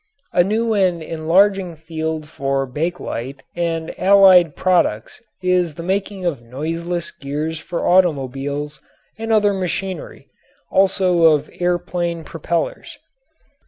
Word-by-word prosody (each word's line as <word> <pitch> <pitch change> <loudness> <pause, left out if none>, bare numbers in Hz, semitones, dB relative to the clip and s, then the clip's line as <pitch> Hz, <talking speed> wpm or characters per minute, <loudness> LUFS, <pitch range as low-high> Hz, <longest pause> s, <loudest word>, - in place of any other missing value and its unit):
A 175 - +5
new 220 +4 0
and 185 -5 +1
enlarging 175 +3 +2
field 160 -1 -4
for 135 -3 -1
bakelite 140 -3 -4
and 165 -1 -2
allied 185 -5 +6
products 175 -13 0 0.2
is 180 -4 +1
the 170 - -7
making 195 +1 -2
of 150 -8 -1
noiseless 165 +8 -4
gears 150 +3 -4
for 170 +1 -3
automobiles 145 -4 +1 0.4
and 225 0 -3
other 210 -2 +4
machinery, 190 0 -4 0.4
also 185 -3 +3
of 150 -2 +3
air 175 0 +2
plane 170 -1 -3
propellers. 165 +1 -3
170 Hz, 115 wpm, -20 LUFS, 155-185 Hz, 0.4 s, allied